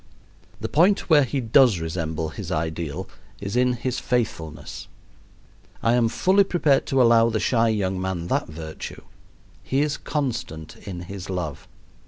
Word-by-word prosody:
The - - -3
point 180 +3 +3
where 150 -2 +7
he 135 +2 -2
does 120 -4 +4
resemble 80 -1 -3
his - - -7
ideal 80 +2 -3 0.3
is 100 +1 -4
in 125 0 +3
his 125 +1 -2
faithfulness. 80 - -3 1.0
I 115 - +3
am 120 -2 +3
fully 190 - +4
prepared 160 -7 +2
to 135 -1 +3
allow 115 -1 +5
the 110 -1 0
shy 115 0 +2
young 95 -4 -1
man 95 -3 -2
that - - 0
virtue: 80 0 -8 0.6
he 135 +2 0
is 150 -1 0
constant 115 - -4
in 90 -3 -5
his 95 +1 -8
love. 90 -6 -4
110 Hz, 150 wpm, -24 LUFS, 85-130 Hz, 1.0 s, where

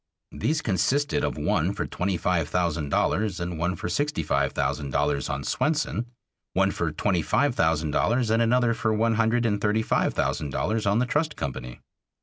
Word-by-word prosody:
These 155 - -1
consisted 130 +9 +1
of - - -1
one - - +1
for - - -2
twenty 90 0 -2
five 85 -3 0
thousand 85 -4 -1
dollars 100 +5 0
and 85 -1 -4
one 90 +2 0
for - - -5
sixty 145 - -1
five 70 -2 +1
thousand 70 - -2
dollars 70 +1 0
on - - -3
Swenson, 150 -6 -1 0.5
one 95 +1 +2
for 85 -4 -2
twenty 90 +3 0
five 130 - +1
thousand 80 -5 +1
dollars 115 - +1
and 115 +1 +3
another 120 0 +3
for 115 -1 -1
one 115 +1 +2
hundred 115 +2 +2
and 105 -3 0
thirty 110 +1 +1
five - - +1
thousand 75 - -1
dollars 110 +9 -1
on 100 +1 +3
the 125 - +2
Trust 150 +4 0
Company. 65 -3 -6
100 Hz, 185 wpm, -26 LUFS, 80-115 Hz, 0.5 s, and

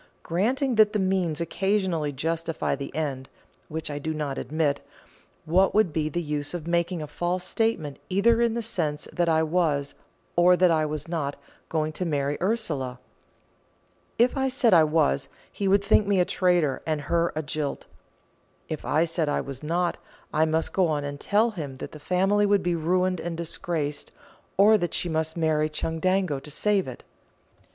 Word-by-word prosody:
Granting 250 - 0
that 210 0 +3
the - - +2
means 185 -5 0
occasionally 185 -3 0
justify 165 +3 -2
the 140 0 -7
end, 140 -4 -3 0.4
which 160 -1 -4
I 145 - -4
do 155 +2 -3
not 145 -3 -3
admit, 150 +1 0 0.6
what 185 +6 +3
would 215 -7 +3
be 155 -1 0
the 175 +3 -2
use 150 +1 -2
of 165 -3 -5
making 170 0 0
a - - -4
false 175 +4 -2
statement 185 -8 -1
either 225 +5 +3
in 235 -1 +2
the 235 - -2
sense 155 -9 -2
that 175 -1 +1
I 160 0 +3
was, 155 -4 0 0.4
or 180 +1 +5
that 180 -1 +4
I 155 -1 +2
was 150 +1 -4
not, 150 -4 -2 0.3
going 155 -1 0
to 170 - -4
marry 145 -4 0
Ursula? 150 - -1 1.2
If 240 +4 +3
I 265 -1 +1
said 255 -4 +2
I 165 -3 +7
was, 150 - +1 0.2
he 200 - -2
would 200 +1 +4
think 205 0 +3
me 200 -2 +3
a 180 - +4
traitor 175 -8 +1
and 155 -2 0
her 170 +4 +1
a 155 - -2
jilt; 145 0 -3 0.8
if 155 - -4
I 155 +2 +2
said 165 -2 -1
I - - 0
was 135 -2 -7
not, 170 +3 -1 0.3
I 155 +1 +3
must 160 +1 0
go 185 -2 +3
on 150 -2 -1
and 145 0 -5
tell 220 +7 +2
him 150 -9 -6
that - - -7
the 155 - -10
family 195 +6 +2
would 200 -1 +3
be 175 - +1
ruined 180 +2 +1
and 170 -1 -4
disgraced, 160 -3 -3 0.5
or 210 +2 +6
that 175 - -2
she 175 - -1
must 160 0 -1
marry 155 -2 +1
Chundango 165 +1 0
to 145 - -12
save 200 +4 +1
it. 130 - -8
165 Hz, 180 wpm, -26 LUFS, 150-185 Hz, 1.2 s, I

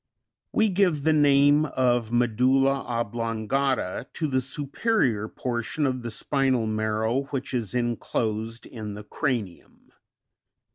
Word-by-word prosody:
16. - - -6
We 220 -1 +4
give 180 -6 +2
the 160 - +4
name 145 0 +5
of 120 -4 +1
medulla 130 +3 +2
oblongata, 115 0 -1
to 160 - -2
the 130 -2 +1
superior 135 - 0
portion 120 +6 -2
of 130 -2 -1
the 120 - -5
spinal 130 0 +1
marrow 110 +4 0
which 135 -2 -5
is 115 -5 -2
enclosed 115 -2 -2
in 110 -4 -7
the 105 - -8
cranium. 110 - -4
125 Hz, 125 wpm, -26 LUFS, 110-140 Hz, -, name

